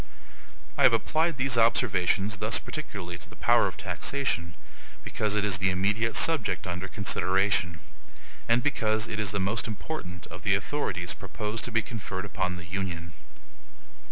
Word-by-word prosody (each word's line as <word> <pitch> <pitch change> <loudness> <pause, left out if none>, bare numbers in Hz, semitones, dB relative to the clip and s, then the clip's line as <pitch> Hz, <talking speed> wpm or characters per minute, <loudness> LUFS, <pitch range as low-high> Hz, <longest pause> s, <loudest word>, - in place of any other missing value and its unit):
I - - +3
have - - +7
applied 160 -1 +1
these 130 -2 +2
observations 105 -3 +2
thus 105 +2 +2
particularly 100 - -6
to 85 - -11
the - - -13
power - - +4
of - - -6
taxation, 100 -12 -2 0.5
because 105 -1 -1
it 105 -1 +2
is 95 -3 +1
the 95 0 +2
immediate 105 +5 +1
subject 155 -11 +3
under 90 +1 -4
consideration, 95 -2 +1 0.7
and 120 +1 +4
because 110 -6 +1
it 110 - -4
is 105 -2 +1
the 100 +1 -1
most 100 +4 0
important 105 - -6
of - - -8
the - - +3
authorities - - -2
proposed 105 +1 -4
to 125 - -5
be 115 0 +2
conferred 100 -4 -5
upon 95 -3 -2
the 85 - -9
Union. 85 -2 -4
105 Hz, 155 wpm, -28 LUFS, 95-115 Hz, 0.7 s, have